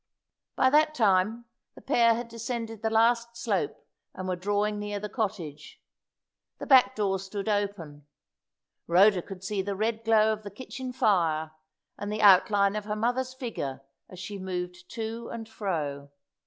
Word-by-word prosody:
By 260 - +3
that 305 +1 +4
time 215 +1 +2 0.3
the - - -13
pair 230 -1 +4
had 235 +1 -4
descended 230 -1 -5
the 220 - 0
last 235 +1 +2
slope, 200 -11 -2 0.3
and 185 0 -5
were 185 - 0
drawing 205 +3 -1
near 205 0 -4
the 210 - -4
cottage. 175 - -4 0.8
The - - -6
back 255 -7 +6
door 195 -3 0
stood 195 +2 -6
open. 195 -9 -2 0.8
Rhoda 185 +2 +5
could 190 0 -10
see 195 0 -1
the 200 +1 -3
red 220 +2 -1
glow 220 -1 +4
of 215 - -7
the 205 - -8
kitchen 255 +4 -7
fire, 165 -9 +1 0.5
and 205 0 -4
the 215 0 -2
outline 200 +1 +5
of 210 -1 -3
her 210 0 -2
mother's 250 +4 -1
figure 145 - -5 0.3
as 185 - -11
she 195 +3 -6
moved 180 -1 -5
to 230 0 -5
and 225 -1 -6
fro. 155 -10 -4
210 Hz, 160 wpm, -28 LUFS, 185-225 Hz, 0.8 s, back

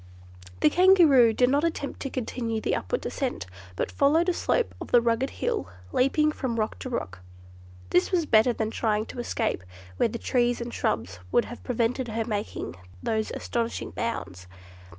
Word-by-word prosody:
The 150 - +5
Kangaroo 335 -11 +6
did 250 +3 +3
not 285 +2 +2
attempt 320 -4 -2
to 275 - -4
continue 235 -3 -3
the - - 0
upward - - -3
ascent, 255 - -3 0.3
but - - -2
followed 320 +5 +3
a - - +2
slope 470 +6 0
of - - -5
the 240 - +6
rugged 235 +3 +1
hill, 90 - -2 0.2
leaping 300 +4 +3
from 245 -6 -3
rock 215 - -2
to 255 - -5
rock. 95 - -4 0.7
This 180 - +3
was 345 -4 +2
better 225 -1 +5
than 220 -2 -2
trying 215 -2 0
to 245 - -9
escape 225 - -1 0.3
where - - +2
the 235 - -4
trees 240 +1 +1
and 235 0 -5
shrubs 95 -5 -2
would 240 - +3
have 240 - -9
prevented 245 +1 0
her 225 0 -2
making 205 - -4 0.3
those 220 -1 0
astonishing 235 -1 -3
bounds. 95 - -4
235 Hz, 170 wpm, -26 LUFS, 220-270 Hz, 0.7 s, Kangaroo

